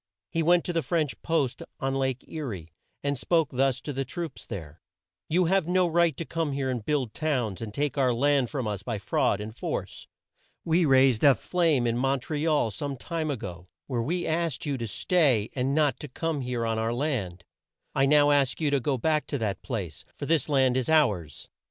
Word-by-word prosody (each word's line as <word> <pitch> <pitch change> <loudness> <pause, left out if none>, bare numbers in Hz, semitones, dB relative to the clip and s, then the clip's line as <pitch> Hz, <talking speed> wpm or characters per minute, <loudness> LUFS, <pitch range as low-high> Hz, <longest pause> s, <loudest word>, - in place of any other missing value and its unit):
He 165 - 0
went 175 +2 +4
to 175 - -2
the 165 - +1
French 160 -4 -1
post 155 -7 0 0.2
on 135 0 -1
Lake 130 -2 -1
E 160 - -6
rie, 95 - -6 0.3
and 140 -2 -1
spoke 165 -2 +2
thus 135 0 +1
to 145 - -5
the 135 +1 -1
troops 165 +2 -6
there: 80 -7 -8 0.5
"You 180 +3 +3
have 190 -1 +2
no 180 0 +3
right 170 -3 +2
to 165 - -4
come 160 -3 -2
here 135 -1 -1
and 120 -4 -3
build 135 -4 -1
towns, 125 - -1
and 110 -2 -5
take 140 +4 -1
our 130 -2 +3
land 135 +1 +2
from 130 -6 -3
us 105 -2 -3
by 110 +1 -3
fraud 100 +1 +1
and 110 +1 -7
force. - - -5 0.6
We 165 +1 +3
raised 130 -4 +4
a 140 -3 +7
flame 165 -8 +1
in 120 0 0
Mon 135 +1 +1
tre 150 +4 -3
al 150 -8 +2
some 140 +6 -4
time 160 +2 -3
a 140 - -1
go, 90 -4 -8 0.2
where 125 -4 -2
we 175 +9 -1
asked 160 -5 -1
you 145 -2 -1
to 115 - -3
stay 130 - +2
and 135 +1 0
not 150 -3 +2
to 150 - -7
come 155 +2 -2
here 125 -2 -2
on 115 -1 0
our 115 +1 -1
land. 110 - -2 0.5
I 135 0 +3
now 145 0 +5
ask 140 -3 +2
you 150 -3 +1
to 140 - +3
go 135 +1 0
back 155 +5 0
to 145 - -2
that 110 -5 -2
place, 95 - -5
for 140 - -5
this 160 0 +1
land 130 -3 +3
is 130 +3 -1
ours. 105 - +1
135 Hz, 215 wpm, -27 LUFS, 120-155 Hz, 0.6 s, a